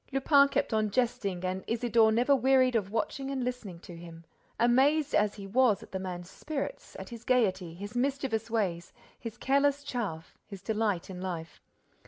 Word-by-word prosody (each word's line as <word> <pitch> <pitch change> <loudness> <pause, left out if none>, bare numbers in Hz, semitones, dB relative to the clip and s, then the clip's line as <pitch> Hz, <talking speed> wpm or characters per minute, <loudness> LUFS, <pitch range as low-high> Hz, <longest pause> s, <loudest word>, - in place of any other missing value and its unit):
Lupin 280 +1 +5
kept 275 - -1
on 215 -1 +1
jesting 200 -6 -1
and 185 +1 -2
Isidore 230 -1 +3
never 245 +5 +3
wearied 260 -1 +3
of 205 -4 0
watching 270 +5 -2
and 270 -2 -2
listening 245 -8 -5
to 175 - -11
him, 165 -1 -11 0.3
amazed 270 +6 +3
as 210 -1 +2
he 200 - -8
was 225 +1 +2
at - - -15
the 190 - -3
man's 180 -2 -6
spirits, 300 - -6
at - - -8
his 235 -2 -9
gaiety, 190 -9 +1
his 205 +5 -8
mischievous 250 -3 -1
ways, 185 -7 -2 0.3
his 230 -1 -7
careless 280 +2 +2
chaff, 210 - -5
his 195 -2 -10
delight 210 -4 -1
in 180 -1 -7
life. 165 -4 -6
225 Hz, 175 wpm, -29 LUFS, 190-260 Hz, 0.3 s, Lupin